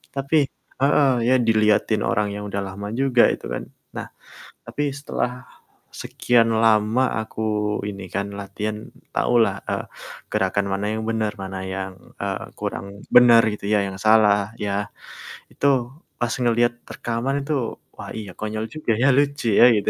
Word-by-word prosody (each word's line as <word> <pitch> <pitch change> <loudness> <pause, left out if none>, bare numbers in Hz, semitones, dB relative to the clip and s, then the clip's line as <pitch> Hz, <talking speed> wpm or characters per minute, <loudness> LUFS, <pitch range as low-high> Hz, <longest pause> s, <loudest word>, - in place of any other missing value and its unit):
Tapi 140 +3 +1 0.4
heeh. 140 0 +4 0.2
Ya 130 - +5
diliatin 110 -2 +3
orang 105 0 +1
yang 105 - -5
udah 100 - -2
lama 100 +2 -6
juga 125 -3 +4
itu - - -8
kan. - - -3 0.3
Nah, - - -5 0.6
tapi 145 - -4 0.2
setelah 140 -3 -2 0.7
sekian 120 -2 +2
lama 110 +2 +3 0.2
aku 110 0 -7 0.5
ini 100 -2 -6
kan 100 0 -1
latihan, 105 +2 -4 0.4
tahulah, 120 -2 +3
eee, - - -2 0.5
gerakan 100 -1 +1
mana 100 +1 -1
yang 110 0 -3
benar, 110 -2 0
mana 95 0 -5 0.2
yang, 95 0 -4 0.3
eee, 100 -1 -2
kurang - - -4 0.3
benar 120 -2 +8
gitu 105 - -8
ya, - - +4
yang 95 - -7
salah 105 -1 +4
ya. 100 - -1 0.8
Itu 140 - 0 0.5
pas 120 -2 0
ngeliat 120 0 +3 0.2
rekaman 120 +4 -2
itu, 155 - -1 0.4
wah - - -8
iya 105 -4 -6
konyol 110 +1 -3
juga 155 -6 -1
ya, 135 - +5
lucu 140 -3 +1
ya - - +9
gitu. 100 - 0
110 Hz, 150 wpm, -23 LUFS, 100-120 Hz, 0.8 s, ya